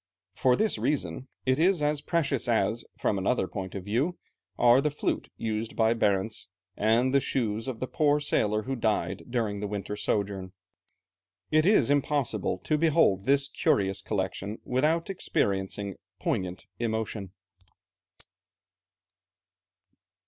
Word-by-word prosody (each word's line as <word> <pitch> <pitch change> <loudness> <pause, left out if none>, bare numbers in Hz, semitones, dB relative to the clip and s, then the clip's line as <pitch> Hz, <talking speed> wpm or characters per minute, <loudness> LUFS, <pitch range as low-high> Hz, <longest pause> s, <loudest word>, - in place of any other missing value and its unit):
For 125 -1 +3
this 220 - +1
reason 130 - -1 0.2
it 130 +1 +2
is 180 +1 +4
as 150 0 +1
precious 150 -6 0
as, 115 0 +1
from 100 - 0
another 95 0 +1
point 95 -1 -6
of 95 -2 -5
view, 130 - 0 0.4
are 120 +2 +6
the 150 - +1
flute 145 - -2
used 110 0 -3
by 110 0 +3
Barentz, 105 -1 0 0.3
and 115 +5 +2
the 140 - +6
shoes 115 -3 -1
of 125 -4 -4
the - - -1
poor 150 +1 +2
sailor 110 -7 +1
who 135 +3 -3
died 105 -5 -1
during 110 -4 -1
the 105 - -3
winter 100 0 -4
sojourn. 100 -2 -2 1.0
It 155 +2 +4
is 150 - +4
impossible 145 -2 0
to 155 -1 +1
behold 150 - +3
this 140 +1 +3
curious 95 -7 +1
collection 100 +1 -3
without 155 +8 +1
experiencing 100 - -1 0.2
poignant 90 0 -2
emotion. 110 -4 -3
115 Hz, 130 wpm, -28 LUFS, 100-140 Hz, 1.0 s, are